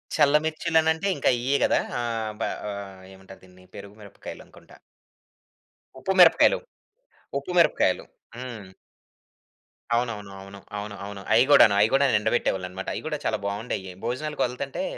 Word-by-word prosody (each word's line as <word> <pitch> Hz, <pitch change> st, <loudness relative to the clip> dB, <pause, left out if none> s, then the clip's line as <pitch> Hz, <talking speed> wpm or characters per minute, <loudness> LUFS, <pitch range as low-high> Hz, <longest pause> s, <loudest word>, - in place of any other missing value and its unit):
చల్ల 150 Hz, -1 st, +4 dB
మిర్చిలనంటే 160 Hz, +2 st, +1 dB
ఇంకా -, -, +2 dB
ఇయే 135 Hz, +3 st, +1 dB
కదా! -, -, +2 dB, 0.2 s
ఆహ్, 115 Hz, -2 st, -3 dB
బ -, -, +1 dB, 0.7 s
ఏమంటారు 95 Hz, 0 st, -15 dB
దీన్ని 90 Hz, 0 st, -19 dB
పెరుగు 100 Hz, +1 st, -10 dB
మిరపకాయలనుకుంటా. 100 Hz, -2 st, -12 dB, 1.2 s
ఉప్పు 190 Hz, -, -2 dB
మిరపకాయలు, 170 Hz, -2 st, +6 dB, 0.8 s
ఉప్పు 140 Hz, -, -8 dB
మిరపకాయలు. 170 Hz, -, +3 dB, 0.3 s
హ్మ్. 120 Hz, -6 st, -8 dB, 1.3 s
అవును. 120 Hz, 0 st, +1 dB
అవును. 100 Hz, -1 st, -11 dB
అవును. 100 Hz, +1 st, -11 dB, 0.2 s
అవును. 105 Hz, 0 st, -6 dB
అవును. 100 Hz, -1 st, -8 dB
అయి 115 Hz, +3 st, +6 dB
కూడాను 140 Hz, -7 st, +7 dB
అయి 105 Hz, +2 st, +4 dB
కూడా 140 Hz, +1 st, +4 dB
ఎండబెట్టేవాళ్ళన్నమాట. 95 Hz, -4 st, -2 dB
అయి -, -, -4 dB
కూడా -, -, -2 dB
చాలా -, -, 0 dB
బావుండేవి. 100 Hz, -2 st, -4 dB
భోజనాలకు 150 Hz, +5 st, -3 dB
వెళ్తుంటే 130 Hz, -, -4 dB
115 Hz, 130 wpm, -25 LUFS, 100-140 Hz, 1.3 s, కూడాను